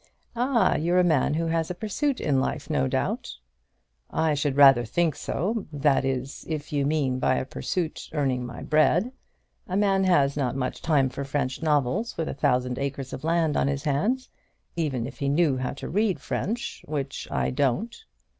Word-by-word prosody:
"Ah, 245 0 +2
you're 170 +3 +1
a 180 - +5
man 155 -3 +2
who 165 +1 0
has 165 0 0
a 180 - -3
pursuit 235 +8 -1
in 140 -3 +1
life, - - -3
no 70 -1 +1
doubt." - - -2 0.7
"I 160 -1 +1
should 145 -1 0
rather 135 -4 +8
think 160 +6 0
so, 210 +4 -2
that 145 -2 +2
is, 135 0 -3
if 150 -2 -4
you 140 -1 +1
mean, 140 -4 0
by 130 - +2
a - - -1
pursuit, 165 +4 -3
earning 135 -5 0
my 120 -1 -7
bread. 165 +9 +3 0.6
A 185 - -1
man 195 -2 +3
has 140 -7 +3
not 135 -4 -1
much 130 -2 -3
time 145 -5 +2
for 135 +2 -5
French 135 -1 -2
novels 155 - 0
with 160 - -1
a - - -3
thousand 125 -2 0
acres 140 -1 -4
of 130 - -6
land 165 -2 +1
on - - +2
his 140 0 -2
hands; 210 - 0 0.5
even 140 -8 -1
if 130 - -9
he 140 - 0
knew 145 -2 +2
how 130 0 -2
to - - -7
read 205 +1 +1
French, 230 +4 -3
which 140 -2 -4
I - - 0
don't." 145 - 0
145 Hz, 185 wpm, -26 LUFS, 135-175 Hz, 0.7 s, rather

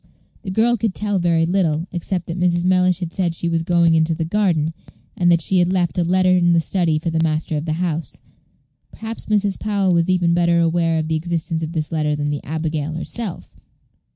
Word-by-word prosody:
The - - -7
girl 230 +5 +2
could 215 -3 -2
tell 205 -2 -1
very 170 -2 +2
little, 165 -3 0
except 175 +1 -3
that 170 +2 -5
Mrs. 175 -1 +1
Mellish 185 0 +2
had 170 -1 -4
said 175 -3 0
that - - -5
she 170 - -3
was 165 -1 0
going 170 -1 +3
into 160 0 +2
the 160 0 -2
garden, 165 -4 0 0.4
and 175 -1 +2
that 170 -1 +3
she 190 +2 +1
had 175 +1 +2
left 180 -3 0
a - - +2
letter 185 +1 +3
in 175 -1 +3
the 170 - +4
study 165 -2 0
for 165 +2 -3
the 160 0 0
master 155 -1 -1
of 150 +1 -3
the 155 - -1
house. 165 -4 -3 0.7
Perhaps 225 +1 -8
Mrs. 205 -2 0
Powell 200 -3 +1
was 170 +1 +1
even 175 -2 +2
better 170 0 +2
aware 165 0 +1
of 155 0 -2
the 160 - 0
existence 165 0 -2
of 160 +1 -4
this 155 -3 -3
letter 150 -2 0
than 145 0 -2
the 145 - -4
abigail 155 0 -3
herself. 185 +4 -5
170 Hz, 220 wpm, -20 LUFS, 160-185 Hz, 0.7 s, the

